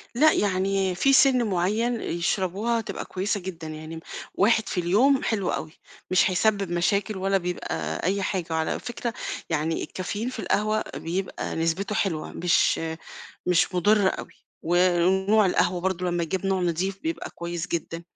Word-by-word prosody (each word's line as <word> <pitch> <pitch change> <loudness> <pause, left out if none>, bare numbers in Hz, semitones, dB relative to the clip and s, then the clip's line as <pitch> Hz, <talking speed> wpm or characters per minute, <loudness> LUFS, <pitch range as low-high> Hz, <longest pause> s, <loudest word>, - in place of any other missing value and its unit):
لأ، 310 +5 +6
يعني 195 -1 +1
في 275 +9 +3
سِن 265 -2 +5
معيّن 215 +4 0
يشربوها 190 +6 0
هتبقى 225 - -5
كويسة 200 +3 -2
جدًا، 175 -4 -7
يعني 155 +1 -7
م - - -6 0.4
1 220 +2 +3
في - - -1
اليوم 230 +11 +3
حلو 200 -5 0
أوي، 155 0 -3 0.4
مش 185 +1 +4
هيسبِّب 195 -1 +1
مشاكل 200 +4 +1
ولا 195 +1 +1
بيبقى 80 - -3
أي 195 +3 +1
حاجة. 185 -3 -1
وعلى 160 0 0
فكرة 240 -1 -4 0.4
يعني 160 +1 -1
الCaffeine 205 +6 -4
في 250 - -7
القهوة 215 0 +1
بيبقى 185 +3 -3
نسبته 175 +6 -1
حلوة 165 -6 -1
مش 175 0 +2 0.7
مش 180 +1 +2
مُضرّة 205 +2 +4
أوي، - - -5 0.3
ونوع 185 +4 +3
القهوة 180 0 +1
برضه 185 0 -1
لمّا 175 -1 0
يجيب 190 +4 -2
نوع 190 -1 +1
نظيف 180 +3 -1
بيبقى 325 0 -3
كويس 170 0 -5
جدًا. 165 0 -3
190 Hz, 150 wpm, -25 LUFS, 175-210 Hz, 0.7 s, لأ